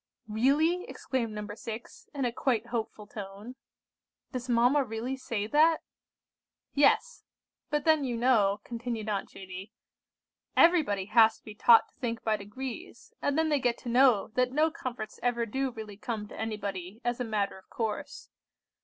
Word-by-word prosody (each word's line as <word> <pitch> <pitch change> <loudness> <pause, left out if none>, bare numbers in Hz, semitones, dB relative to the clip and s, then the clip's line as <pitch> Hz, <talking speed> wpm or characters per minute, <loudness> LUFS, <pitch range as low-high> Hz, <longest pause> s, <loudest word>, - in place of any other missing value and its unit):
"Really?" 290 - +2
exclaimed 240 -4 -2
No. 210 0 -5
6, 225 +1 -8
in 275 -2 0
a 240 - +1
quite 235 -2 0
hopeful 225 -2 -4
tone. 205 +3 -8 0.8
"Does 255 -1 -5
mamma 245 +4 +4
really 235 +2 -3
say 230 -5 -3
that?" 310 +7 +4 0.9
"Yes; 485 - +3 0.5
but 295 -1 0
then 315 -2 +4
you 245 -3 -2
know," 215 -5 +3
continued 230 -2 -4
Aunt 200 -2 -2
Judy, 190 +2 -9 0.8
"everybody 300 - +4
has 220 +1 +5
to - - -31
be 215 - -9
taught 230 +2 +6
to - - -34
think 230 -2 -3
by 220 -1 +2
degrees, 245 - -8
and 285 +1 0
then 320 0 +2
they 295 -2 +2
get 245 -2 +1
to 245 - -7
know 245 -4 +4
that 250 +2 +1
no 310 +4 +3
comforts 240 -8 -6
ever 240 -1 +1
do 265 +4 -1
really 220 -4 -8
come 215 -1 -4
to - - -10
anybody 200 -3 -4
as 240 0 0
a - - 0
matter 205 -4 -1
of - - -25
course. 220 -2 -4
235 Hz, 160 wpm, -29 LUFS, 215-265 Hz, 0.9 s, taught